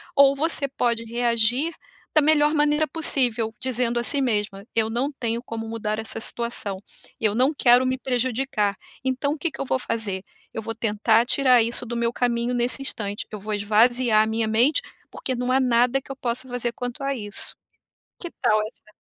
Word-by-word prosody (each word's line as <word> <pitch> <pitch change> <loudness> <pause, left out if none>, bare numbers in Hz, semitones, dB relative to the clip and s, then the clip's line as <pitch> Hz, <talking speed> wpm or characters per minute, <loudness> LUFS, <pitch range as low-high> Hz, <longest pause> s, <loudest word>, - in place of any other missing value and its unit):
ou 280 0 +6
você 300 -1 +1
pode 235 -3 -1
reagir 240 +6 +1 0.4
da 310 - +6
melhor 300 0 +3
maneira 295 0 +2
possível, 245 -8 +1
dizendo 245 -2 0
a - - -2
si 280 +3 +2
mesma: 210 -4 -1
"Eu 220 -1 +2
não 250 +6 -1
tenho 235 -3 -3
como 225 -1 -6
mudar 215 -1 -3
essa 220 0 -3
situação, 230 -4 -2 0.4
eu 215 -2 +2
não 260 +5 +3
quero 250 -2 +4
me 260 0 0
prejudicar, 245 -5 -1 0.3
então, 265 +2 -1
o - - -6
que 335 +3 -1
que - - -7
eu - - -2
vou 260 - 0
fazer? 210 -6 -3 0.3
Eu 225 - -4
vou 225 +1 -5
tentar 225 +1 +2
tirar 255 -2 +4
isso 235 +2 -1
do 240 +1 -5
meu 235 0 0
caminho 240 0 0
nesse 245 +2 0
instante. 205 -5 -1
Eu 210 - -6
vou 215 +2 -4
esvaziar 220 +2 +3
a - - -2
minha 220 0 -1
mente, 240 +7 +3 0.3
porque 260 - -4
não 250 +1 -2
há 265 - +4
nada 250 +1 +3
que 270 - -11
eu - - -5
possa 250 0 -3
fazer 245 -1 -2
quanto 245 +1 -6
a 275 0 -1
isso". 205 -4 -2 0.6
Que 345 - -6
tal 215 - +3
essa 210 - -19
240 Hz, 190 wpm, -23 LUFS, 225-265 Hz, 0.6 s, ou